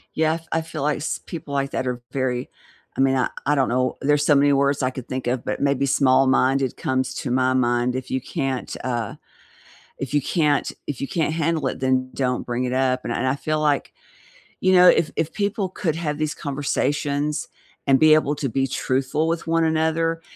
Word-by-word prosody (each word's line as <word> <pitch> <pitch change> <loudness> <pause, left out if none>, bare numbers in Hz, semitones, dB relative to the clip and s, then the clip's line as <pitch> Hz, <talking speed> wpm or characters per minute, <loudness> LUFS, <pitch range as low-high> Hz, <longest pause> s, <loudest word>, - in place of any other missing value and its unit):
Yeah, 160 0 +2
f 165 0 -8
I 165 - +2
feel, 165 -3 -6
like, 150 +1 +1
s 145 - -3
people 150 -4 -6
like 140 0 0
that 130 - -2
are 125 -1 -3
very 130 -2 -2 0.5
I - - -1
mean, 135 0 +3
I 130 - +1 0.2
I 145 - +3
don't 135 -2 +2
know, 125 +1 0
there's 145 +1 +2
so 150 - +5
many 145 0 +4
words 140 0 +2
I 130 - +1
could 130 -1 -8
think 130 -1 -4
of, 125 0 -1
but - - -2
maybe 140 -1 +1
"small-minded" 130 0 +3
comes 130 0 -1
to 125 - -4
my 130 +1 +2
mind; 120 0 +1
if 130 -1 -6
you 130 - 0
can't, 135 -2 -3
uh 120 -4 -2 0.8
if 135 0 -5
you 145 - +3
can't 150 -1 +1 0.2
if 145 -3 -4
you 140 - -2
can't 160 0 -1
handle 160 -3 0
it, - - -4
then 130 -1 +1
don't 125 -2 -1
bring 120 +1 -2
it 125 - -2
up, 130 -1 +1
and 120 - -2
I 130 +2 0
I - - -1
feel 155 +2 -2
like, 145 -2 0 0.7
you 185 - +3
know, 180 0 +8
if 155 - +3
if 160 0 -1
people 205 -1 -1
could 175 -3 -2
have 150 -3 -3
these 155 0 -1
conversations 145 +1 -1 0.4
and 135 -1 +4
be 155 0 +7
able 150 -1 +2
to 140 - -2
be 135 +3 0
truthful 135 +4 -1
with 165 0 -2
one 165 0 +2
another 160 +1 0
140 Hz, 210 wpm, -23 LUFS, 130-155 Hz, 0.8 s, know